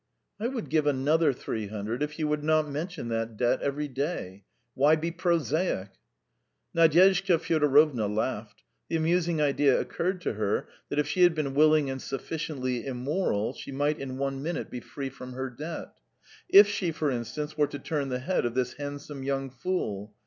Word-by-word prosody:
"I 225 - 0
would 245 -3 -4
give 155 -2 +2
another 145 +3 +3
three 110 -4 -4
hundred 110 +4 -4
if 150 +1 -2
you 155 -2 0
would 150 0 -1
not 155 0 +3
mention 150 -2 -4
that 115 -1 -2
debt 120 +1 +2
every 145 +1 -1
day. 130 - -4 0.3
Why 145 +4 +5
be 165 +2 -2
prosaic?" 170 - 0 0.9
Nadyezhda 180 +3 +5
Fyodorovna 150 -7 +3
laughed; 105 +1 -3 0.3
the - - -1
amusing 165 0 +1
idea 145 -2 +3
occurred 185 +2 -2
to - - -1
her 105 -1 -1 0.2
that 145 - -3
if 150 -1 +2
she 180 - 0
had 175 -2 +6
been 145 -3 -1
willing 155 -1 +4
and 130 -1 -5
sufficiently 135 -4 -3
immoral 130 - -1
she - - -9
might 145 +2 0
in 130 -1 -5
one 135 0 -2
minute 165 +4 -3
be 125 - -4
free 135 +3 -6
from 125 -1 -9
her 130 0 -4
debt. 155 +7 -7 0.6
If 200 +2 +10
she, 200 -4 -1
for 155 -2 -1
instance, 125 +6 -4
were 150 -1 +3
to 145 - -6
turn 140 0 -2
the 125 - -1
head 175 +9 0
of 120 0 -2
this 125 -1 0
handsome 145 0 -6
young 135 0 -2
fool! 110 - -3
145 Hz, 180 wpm, -28 LUFS, 130-160 Hz, 0.9 s, If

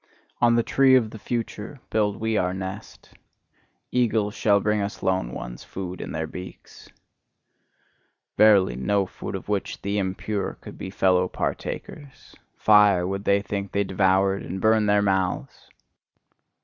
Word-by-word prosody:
On 120 -1 +5
the 115 - +3
tree 135 +1 +4
of 115 -4 +2
the 110 - -9
future 115 +3 -5
build 105 -2 0
we 110 0 -1
our 90 -2 0
nest; 95 0 -8 0.8
eagles 110 -4 +1
shall 100 -2 +3
bring 105 +1 0
us 100 +1 -5
lone 95 -10 0
ones - - -7
food 90 -1 -6
in - - -6
their 80 0 -2
beaks! 90 +3 -11 1.5
Verily, 100 - +5
no 100 +10 +1
food 95 - -7
of 95 - -7
which 100 -1 -2
the 100 +1 -1
impure 95 +2 -3
could - - -11
be 95 - -5
fellow 90 -1 +2
partakers! 140 - -6 0.2
Fire, 105 -4 +5
would 100 +2 -4
they 100 0 +3
think 100 -2 -4
they 100 - +2
devoured, 95 0 +2
and 95 +2 -5
burn 110 +1 +3
their 105 0 +3
mouths! 95 -2 -1
100 Hz, 150 wpm, -24 LUFS, 95-105 Hz, 1.5 s, On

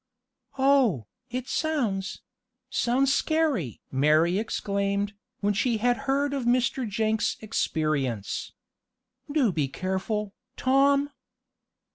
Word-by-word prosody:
"Oh, 265 - +3 0.2
it 250 +1 -4
sounds 230 -14 -1 0.5
sounds 265 +3 +2
scary!" 295 - 0
Mary 155 +7 +3
exclaimed, 200 -2 -1 0.3
when 205 0 +2
she 230 +3 +1
had 245 +3 +2
heard 280 +1 +1
of 270 -3 -2
Mr. 245 0 +1
Jenks' 220 +1 0
experience. 155 - -1 0.8
"Do 280 -8 +3
be 150 -5 0
careful, 190 +6 -3 0.2
Tom!" 280 +2 +3
220 Hz, 95 wpm, -27 LUFS, 190-265 Hz, 0.8 s, Oh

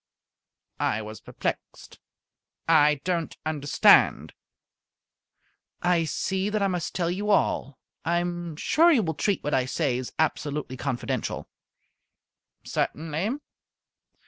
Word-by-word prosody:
I 110 - 0
was 110 0 -9
perplexed. - - -5 0.7
"I 150 -3 +5
don't 175 -3 -2
understand." 145 -2 +4 1.5
"I 175 -2 +3
see 190 +5 -1
that 210 -1 0
I - - +3
must 180 -3 -3
tell 175 -2 0
you 205 +4 -3
all. 140 - +1 0.3
I 170 +2 +1
am 175 -2 -3
sure 330 - +4
you 250 -9 +4
will 160 -2 -1
treat 195 +6 -1
what 150 - -2
I 130 -1 +2
say 130 -2 0
as 130 - -6
absolutely 150 -3 -1
confidential." 130 -1 -3 1.2
"Certainly." 165 - -2
165 Hz, 115 wpm, -26 LUFS, 145-180 Hz, 1.5 s, I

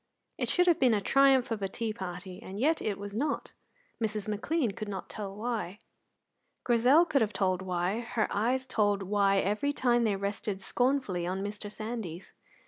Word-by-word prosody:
It - - 0
should 360 - +3
have 345 -2 +4
been 250 -4 +4
a - - +2
triumph 270 +3 +4
of 220 -2 -2
a 195 - 0
tea 220 +3 -3
party, 185 -1 -7
and 195 -2 -7
yet 310 +6 +2
it 205 -2 -1
was 200 0 -7
not. 285 +5 -2 0.5
Mrs. 215 -2 -2
McLean 230 +5 0
could 215 +2 -6
not 195 -2 -5
tell 200 -2 -6
why. 215 -4 -3 0.9
Grizel 250 +8 +5
could 280 -5 +2
have 215 -1 +1
told 185 -2 +1
why; 185 +3 -1
her 230 -2 -1
eyes 245 +6 +1
told 205 -5 +1
why 200 0 +2
every 210 +9 +1
time 240 -4 +2
they 215 -3 +2
rested 200 0 -3
scornfully 245 -5 0
on 190 +2 -2
Mr. 205 +1 -5
Sandys. 215 -6 -6
210 Hz, 180 wpm, -30 LUFS, 195-245 Hz, 0.9 s, Grizel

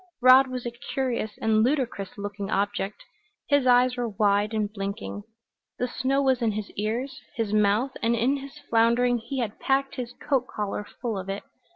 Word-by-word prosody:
Rod 255 +2 +7
was 255 -1 -5
a 240 - -2
curious 240 -2 -3
and 220 -1 +4
ludicrous 245 -7 -1
looking 200 0 -5
object. 200 0 -1 0.5
His 285 -2 +3
eyes 250 0 +5
were 240 -1 -1
wide 205 0 +2
and 215 -2 0
blinking; 200 +1 -4 0.6
the 250 - 0
snow 265 +2 0
was 260 -2 +2
in 225 -2 +1
his 210 0 -5
ears, 230 +6 -3
his 225 -3 -1
mouth, 210 +5 +3
and 235 +1 +2
in 250 +5 +2
his 275 +1 -9
floundering 235 +2 +3
he 270 +4 -6
had 220 -3 -4
packed 275 +1 0
his 245 -1 -4
coat 265 -2 -1
collar 210 0 -3 0.2
full 225 -5 -1
of 190 +1 -7
it. 195 +1 -3
235 Hz, 180 wpm, -26 LUFS, 210-255 Hz, 0.6 s, Rod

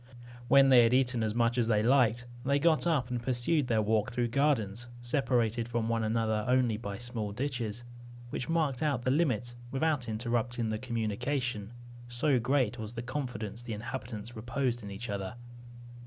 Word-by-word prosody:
When 135 +1 +6
they 125 -2 +8
had 115 +1 +4
eaten 125 -2 +2
as 110 0 -1
much 120 +1 +2
as 115 - +2
they 105 -2 +2
liked, 120 -1 +3 0.2
they 140 +1 +2
got 160 +2 +3
up, 135 -7 +1
and 120 -1 -2
pursued 130 +4 +1
their 110 -3 +2
walk 110 0 +1
through 120 0 0
gardens 120 -5 +1
separated 120 -3 0
from 115 -1 -1
one 115 -1 +1
another 110 -1 0
only 125 -3 +3
by 100 -3 -5
small 120 -3 -4
ditches, 120 -2 -3 0.5
which 130 - -4
marked 155 -6 +1
out 140 -6 0
the 130 - +2
limits 125 -6 +1
without 135 -2 0
interrupting 115 +1 -1
the 110 0 -2
communication; 115 -1 -2 0.4
so 125 +3 +1
great 125 -1 +1
was 110 0 -5
the 115 0 -5
confidence 120 -5 -4
the 120 -2 -5
inhabitants 115 0 -6
reposed 120 +2 -2
in 100 - -7
each 100 +5 -6
other. 100 -1 -4
120 Hz, 170 wpm, -30 LUFS, 110-130 Hz, 0.5 s, they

